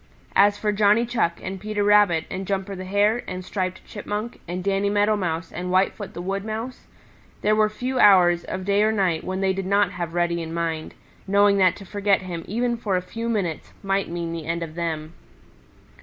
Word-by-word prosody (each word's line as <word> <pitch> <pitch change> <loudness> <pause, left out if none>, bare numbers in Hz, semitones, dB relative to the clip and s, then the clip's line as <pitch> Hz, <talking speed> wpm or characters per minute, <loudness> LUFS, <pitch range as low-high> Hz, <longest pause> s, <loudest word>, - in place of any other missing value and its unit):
As 205 +1 +5
for 210 0 0
Johnny 210 +3 +3
Chuck 225 -8 0
and 190 +1 -5
Peter 210 +1 -2
Rabbit 205 -6 +4
and 190 0 -4
Jumper 195 0 -2
the 185 0 -7
Hare 205 +5 +2
and 185 0 -5
Striped 185 -1 -3
Chipmunk 210 +2 -5
and 180 +2 -4
Danny 200 +1 +1
Meadow 205 +1 +2
Mouse 165 -4 -3
and 180 +2 -5
Whitefoot 190 +2 0
the 175 - -5
Wood 195 +1 -2
Mouse, 225 +4 -6 0.6
there 215 +1 +3
were 215 0 +3
few 250 +4 -3
hours 175 -4 +6
of 185 0 -5
day 200 +1 +2
or 215 +1 +3
night 185 -7 0
when 185 +1 -3
they 190 0 +2
did 190 0 -4
not 200 +1 +3
have 170 -1 -5
Reddy 170 -1 +1
in 165 0 -5
mind, 165 -2 -3 0.3
knowing 200 +1 +4
that 185 -2 +4
to 200 - -11
forget 200 +1 +1
him 170 -3 -5
even 235 +3 -1
for 210 -4 -1
a 180 - +1
few 230 +5 -5
minutes 190 -8 -2
might 195 0 0
mean 170 -1 -4
the 165 -2 -6
end 170 0 -1
of 160 -2 -7
them. 160 -2 -4
195 Hz, 205 wpm, -24 LUFS, 175-205 Hz, 0.6 s, hours